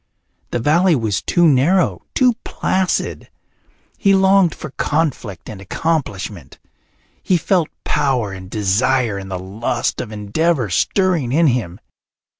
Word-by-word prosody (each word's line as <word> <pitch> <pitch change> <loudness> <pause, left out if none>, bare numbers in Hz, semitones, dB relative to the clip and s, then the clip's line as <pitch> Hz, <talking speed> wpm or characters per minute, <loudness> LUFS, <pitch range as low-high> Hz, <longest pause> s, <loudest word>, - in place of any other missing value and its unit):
The - - -1
valley 165 +8 +3
was 110 -5 -1
too 175 -1 +3
narrow, 160 +6 +2
too 250 -2 +4
placid. 185 -1 -1 0.7
He 195 -2 +4
longed 190 -2 +4
for 155 - -8
conflict 140 - -2
and 100 -3 -8
accomplishment. 100 - -3 0.6
He 185 - +2
felt 170 -1 +1
power 130 -8 0
and 95 -1 -9
desire 110 +2 +1
and 95 0 -9
the 95 - -3
lust 95 +5 -2
of 115 - -7
endeavour 110 - -1
stirring 170 - +1
in 165 +5 +3
him. 120 - 0
130 Hz, 125 wpm, -19 LUFS, 105-170 Hz, 0.7 s, too